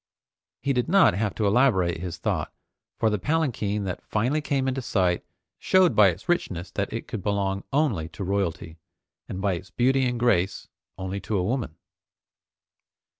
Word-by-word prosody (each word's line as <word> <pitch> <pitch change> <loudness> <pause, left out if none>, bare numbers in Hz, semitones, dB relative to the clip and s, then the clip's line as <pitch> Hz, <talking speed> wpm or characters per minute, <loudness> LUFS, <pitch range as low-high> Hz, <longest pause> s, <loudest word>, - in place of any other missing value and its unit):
He 140 - +1
did 125 +3 0
not 165 - +6
have 105 +1 -1
to 110 - 0
elaborate 100 -7 +3
his 90 -2 -5
thought, - - -2 0.5
for 110 - +2
the 105 - 0
palanquin 110 - 0
that 95 -2 -4
finally 125 +8 0
came 135 -2 0
in 130 - +1
sight 90 -7 +1 0.4
showed 185 -2 +4
by 105 -2 +7
its 95 - -3
richness 95 - -1
that 100 - -2
it 115 - -5
could 110 - -5
belong 100 -1 -1
only 125 - +1
to 100 - -7
royalty, 90 -4 -2 0.5
and 95 - -4
by 100 -1 +1
its 90 +2 -6
beauty 130 +1 +2
and 125 -1 -2
grace, 95 -6 +1 0.3
only 95 +1 -4
to 105 +1 -2
a 90 - 0
woman. 115 - -2
105 Hz, 170 wpm, -25 LUFS, 95-130 Hz, 0.5 s, by